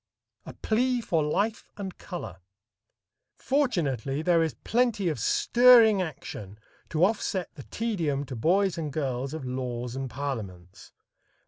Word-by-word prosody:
A -, -, -7 dB
Plea 245 Hz, +3 st, 0 dB
for 170 Hz, -8 st, 0 dB
Life 200 Hz, +9 st, -1 dB
and 195 Hz, -3 st, -6 dB
Color. 175 Hz, -, -7 dB, 1.0 s
Fortunately 155 Hz, -, 0 dB
there 170 Hz, -1 st, +3 dB
is 160 Hz, -2 st, -1 dB
plenty 230 Hz, -6 st, +1 dB
of 150 Hz, -, -3 dB
stirring 235 Hz, -, +5 dB
action 110 Hz, -, -7 dB, 0.3 s
to 165 Hz, +2 st, +3 dB
offset 200 Hz, -3 st, -2 dB
the 150 Hz, -, -10 dB
tedium 165 Hz, -11 st, -2 dB
(to 130 Hz, -, -7 dB
boys 180 Hz, -, +2 dB
and 155 Hz, -3 st, -3 dB
girls) 135 Hz, -1 st, -3 dB
of 155 Hz, -4 st, -6 dB
laws 125 Hz, -1 st, -4 dB
and 135 Hz, -1 st, -4 dB
parliaments. 105 Hz, -8 st, -6 dB
160 Hz, 130 wpm, -27 LUFS, 130-205 Hz, 1.0 s, stirring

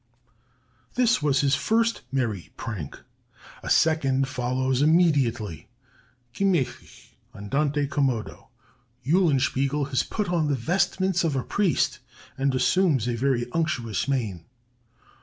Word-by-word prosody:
"This 245 Hz, -5 st, +3 dB
was 145 Hz, -2 st, +2 dB
his 140 Hz, -2 st, +2 dB
first 230 Hz, +9 st, +1 dB
merry 110 Hz, -, -2 dB
prank; 100 Hz, -11 st, -6 dB, 0.6 s
a -, -, -6 dB
second 135 Hz, -4 st, +2 dB
follows 130 Hz, 0 st, -1 dB
immediately; 140 Hz, -, +2 dB, 0.7 s
Gemächlich 180 Hz, -5 st, -2 dB, 0.3 s
[Andante 145 Hz, +8 st, -1 dB
commodo]. 135 Hz, -6 st, -2 dB, 0.6 s
Eulenspiegel 140 Hz, -3 st, +1 dB
has 130 Hz, -3 st, +1 dB
put 210 Hz, -3 st, -3 dB
on 170 Hz, -3 st, +1 dB
the 145 Hz, -, +1 dB
vestments 180 Hz, +6 st, 0 dB
of 160 Hz, -4 st, 0 dB
a 130 Hz, -, -1 dB
priest, 200 Hz, -5 st, 0 dB, 0.4 s
and 135 Hz, 0 st, 0 dB
assumes 145 Hz, -, +2 dB
a 120 Hz, -, 0 dB
very 120 Hz, 0 st, 0 dB
unctuous 130 Hz, -9 st, -1 dB
mien. 110 Hz, -11 st, -2 dB
140 Hz, 110 wpm, -25 LUFS, 125-165 Hz, 0.7 s, This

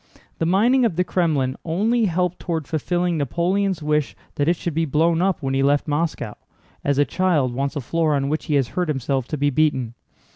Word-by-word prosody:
The 165 Hz, -, +1 dB
mining 235 Hz, +9 st, +3 dB
of 225 Hz, -8 st, +1 dB
the 180 Hz, -, +2 dB
Krémlin 150 Hz, -9 st, +1 dB
only 215 Hz, +8 st, +1 dB
helped 180 Hz, -1 st, 0 dB
toward 160 Hz, -5 st, -3 dB
fulfilling 175 Hz, +1 st, -1 dB
Napoleon's 175 Hz, +5 st, 0 dB
wish 150 Hz, -1 st, 0 dB, 0.2 s
that 145 Hz, -, -1 dB
it 170 Hz, -, +3 dB
should 170 Hz, -1 st, -4 dB
be 165 Hz, +2 st, +1 dB
blown 160 Hz, +3 st, +2 dB
up 185 Hz, -4 st, 0 dB
when 135 Hz, 0 st, -1 dB
he 135 Hz, -, +1 dB
left 140 Hz, +2 st, +2 dB
Moscow—as 145 Hz, -2 st, -4 dB
a 145 Hz, -, +4 dB
child 150 Hz, -5 st, +1 dB
wants 140 Hz, +4 st, -2 dB
the 145 Hz, -, -2 dB
floor 155 Hz, +3 st, 0 dB
on 140 Hz, -1 st, 0 dB
which 155 Hz, +2 st, -2 dB
he 150 Hz, -, 0 dB
has 135 Hz, -4 st, +1 dB
hurt 180 Hz, -1 st, -1 dB
himself 135 Hz, -3 st, -1 dB
to 155 Hz, -, -3 dB
be 145 Hz, +1 st, +1 dB
beaten. 130 Hz, -5 st, +1 dB
155 Hz, 205 wpm, -22 LUFS, 140-175 Hz, 0.2 s, a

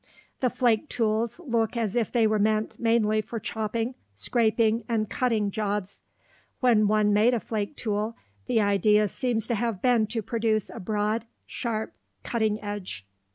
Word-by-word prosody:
The 255 Hz, -, +2 dB
flake 240 Hz, +3 st, +1 dB
tools 225 Hz, +3 st, 0 dB
look 230 Hz, -2 st, 0 dB
as 220 Hz, -3 st, -1 dB
if 235 Hz, -4 st, 0 dB
they 235 Hz, -3 st, +3 dB
were 215 Hz, -1 st, +2 dB
meant 215 Hz, +1 st, 0 dB
mainly 220 Hz, -2 st, +2 dB
for 230 Hz, +1 st, -6 dB
chopping, 225 Hz, +3 st, -2 dB, 0.2 s
scraping, 225 Hz, -, +2 dB
and 220 Hz, -2 st, 0 dB
cutting 220 Hz, -4 st, 0 dB
jobs. 205 Hz, -2 st, -3 dB, 0.6 s
When 225 Hz, -5 st, +4 dB
one 210 Hz, 0 st, +3 dB
made 225 Hz, +4 st, +4 dB
a -, -, 0 dB
flake 215 Hz, +4 st, -3 dB
tool, 215 Hz, -1 st, -2 dB, 0.3 s
the 225 Hz, -, +2 dB
idea 210 Hz, +1 st, +3 dB
seems 230 Hz, 0 st, -1 dB
to -, -, +2 dB
have 230 Hz, -3 st, -1 dB
been 240 Hz, -3 st, +3 dB
to 225 Hz, 0 st, -3 dB
produce 220 Hz, -2 st, 0 dB
a 235 Hz, -, -8 dB
broad, 210 Hz, +3 st, -1 dB, 0.2 s
sharp, 220 Hz, -2 st, -3 dB, 0.3 s
cutting 220 Hz, -3 st, 0 dB
edge. 205 Hz, -, -5 dB
220 Hz, 155 wpm, -26 LUFS, 210-235 Hz, 0.6 s, When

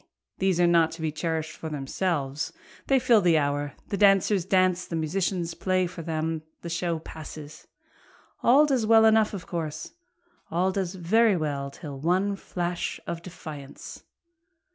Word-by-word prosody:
these 190 Hz, -2 st, +1 dB
are 175 Hz, -, +5 dB
not 170 Hz, -2 st, +4 dB
to 165 Hz, +1 st, -10 dB
be 160 Hz, -1 st, -1 dB
cherish'd 160 Hz, 0 st, -2 dB
for 160 Hz, -, -6 dB
themselves, 145 Hz, 0 st, -2 dB, 0.4 s
They 270 Hz, -, +4 dB
fill 240 Hz, -4 st, +4 dB
their 170 Hz, -4 st, +4 dB
hour, 145 Hz, 0 st, -1 dB, 0.2 s
the 200 Hz, -, -1 dB
dancers 195 Hz, -1 st, +4 dB
dance, 185 Hz, -1 st, +2 dB
the 165 Hz, -, -4 dB
musicians 170 Hz, +1 st, -1 dB
play 185 Hz, +1 st, 0 dB
for 175 Hz, -1 st, -7 dB
them, 160 Hz, 0 st, -2 dB, 0.2 s
The 170 Hz, -, -5 dB
show 170 Hz, 0 st, -1 dB
passes, 155 Hz, -1 st, -10 dB, 0.7 s
all 275 Hz, +5 st, +6 dB
does 260 Hz, -7 st, +1 dB
well 225 Hz, 0 st, +7 dB
enough 220 Hz, -1 st, +4 dB
of 175 Hz, -4 st, -7 dB
course, 160 Hz, -3 st, -4 dB, 0.6 s
All 180 Hz, +3 st, +1 dB
does 190 Hz, -1 st, -2 dB
very 200 Hz, +4 st, +3 dB
well 145 Hz, -3 st, -2 dB
till 140 Hz, -1 st, -9 dB
one 185 Hz, +6 st, +1 dB
flash 175 Hz, -2 st, -3 dB
of 170 Hz, 0 st, -4 dB
defiance. 155 Hz, -5 st, -9 dB
170 Hz, 155 wpm, -26 LUFS, 155-190 Hz, 0.7 s, well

